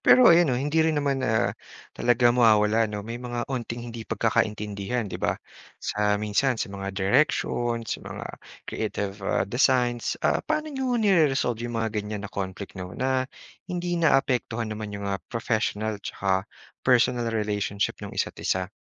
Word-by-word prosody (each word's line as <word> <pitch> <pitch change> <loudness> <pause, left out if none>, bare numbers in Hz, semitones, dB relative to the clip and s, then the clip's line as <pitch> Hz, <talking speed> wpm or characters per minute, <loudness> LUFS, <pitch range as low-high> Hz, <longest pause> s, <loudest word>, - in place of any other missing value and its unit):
Pero 255 -8 +7
ayun 170 -2 +5
'no, 125 - +1
hindi 145 +5 +1
rin 160 -1 +2
naman, 140 -2 +1
ah, 120 -2 +1 0.4
talaga 120 0 +3
mawawala 110 -2 +4
‘no, 105 -1 -5
may 120 +2 -6
mga 120 -1 -3
'onting 120 -1 -4
hindi 115 -1 -7
pagkakaintindihan, 110 0 0
‘di - - -5
ba? - - +1 0.4
Sa 105 0 0
minsan, 105 +5 +1
sa 100 - -3
mga 100 0 -5
directions, 120 +1 +1
sa - - -4
mga - - -7 0.4
creative, 100 0 -3
ah, 95 - +1
designs. 120 +1 +2
Ah, - - +3
paano 305 0 -2
niyo 265 -1 -2
nire-resolve 150 - +3
‘yong 115 - -4
mga 110 -1 0
ganyan 105 -1 -3
na 100 - -8
conflict 95 0 -5
'no, 90 -1 -7
na 130 0 0 0.4
hindi 175 -1 -2
naapektuhan 125 -7 +1
naman 105 -1 -5
‘yong 100 - -6
mga 100 -1 -2
professional 110 -2 -1
tsaka 95 0 -1 0.3
personal 120 -1 +3
relationship 105 -2 -1
no'ng - - -7
isa’t - - -2
isa? 95 +1 -1
115 Hz, 160 wpm, -26 LUFS, 105-130 Hz, 0.4 s, Pero